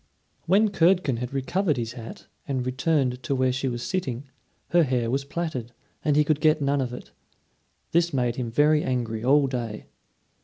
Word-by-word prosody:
When 205 +5 +4
Curdken 175 -8 +2
had 125 +1 -4
recovered 150 +4 0
his 115 -1 -3
hat 115 -3 -9 0.2
and 130 -3 -1
returned 130 -1 0
to 135 - -1
where 130 0 +2
she 135 +1 -2
was 120 -1 -3
sitting, 135 -9 -2 0.5
her 175 - +4
hair 125 -6 0
was 135 +1 0
plaited, 140 -6 -4 0.3
and 150 -2 +2
he 150 - +5
could 150 0 0
get 155 -1 +4
none 140 -1 +1
of 125 -2 -2
it. 125 - -9 0.8
This 170 +1 +2
made 125 -4 0
him 125 -2 -3
very 150 +5 +3
angry 115 -4 -2
all 140 +3 +4
day. 120 -5 -4
135 Hz, 180 wpm, -25 LUFS, 125-155 Hz, 0.8 s, he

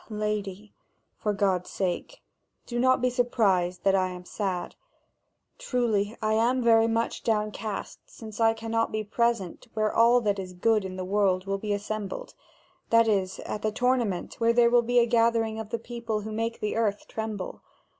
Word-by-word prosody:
"Ah, 220 - -11
lady, 210 -1 -3 0.5
for 210 - 0
God's 195 -3 0
sake, 190 - -3 0.4
do 240 -1 -3
not 255 0 +3
be 255 - +4
surprised 200 -8 +1
that 195 - +4
I 190 -1 +2
am 180 -1 -8
sad! 190 -2 -3 0.9
Truly, 220 -4 0
I 215 0 +2
am 240 +3 +2
very 225 -1 +5
much 230 0 -1
downcast, 215 -1 -2
since 220 -1 -10
I 225 0 +4
cannot 225 0 -1
be 215 0 -2
present 230 -2 -1
where 215 -1 +1
all 235 +2 +5
that 205 -3 0
is 185 -1 -6
good 215 +3 +2
in 185 -1 -6
the 185 0 -4
world 190 -1 +1
will 195 0 -2
be 210 +1 -3
assembled: 205 -1 -4 0.6
that 230 0 +5
is, 190 -3 0
at 210 - -5
the 215 - 0
tournament 240 -5 0
where 230 0 +3
there 235 0 +4
will 240 0 +6
be 245 +1 0
a 240 - +6
gathering 230 -1 +2
of 220 -1 -6
the 230 - -1
people 230 -2 -4
who 215 +1 -6
make 225 +1 -3
the 210 - -1
earth 215 -3 -1
tremble. 220 -4 -5
215 Hz, 180 wpm, -27 LUFS, 200-230 Hz, 0.9 s, will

